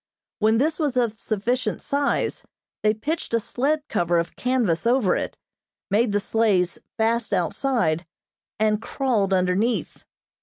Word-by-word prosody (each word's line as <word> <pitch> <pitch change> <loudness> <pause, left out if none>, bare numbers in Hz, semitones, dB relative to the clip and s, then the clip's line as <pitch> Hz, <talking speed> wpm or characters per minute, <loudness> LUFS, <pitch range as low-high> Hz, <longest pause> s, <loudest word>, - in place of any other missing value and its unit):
When 220 +1 +3
this 305 +6 +1
was 285 -5 0
of 230 -3 0
sufficient 235 +4 -1
size, 280 0 0 0.4
they 215 0 +3
pitched 295 +2 -2
a - - +3
sled 285 +7 -1
cover 175 -4 +1
of 170 0 -2
canvas 240 -7 0
over 240 -6 +3
it, - - -3 0.5
made 215 +2 +3
the 205 - +2
sleighs 200 -4 +1 0.2
fast 225 +1 +1
outside, 180 - 0 0.5
and 215 0 +2
crawled 230 -8 0
underneath. 190 +5 0
225 Hz, 130 wpm, -24 LUFS, 195-255 Hz, 0.5 s, When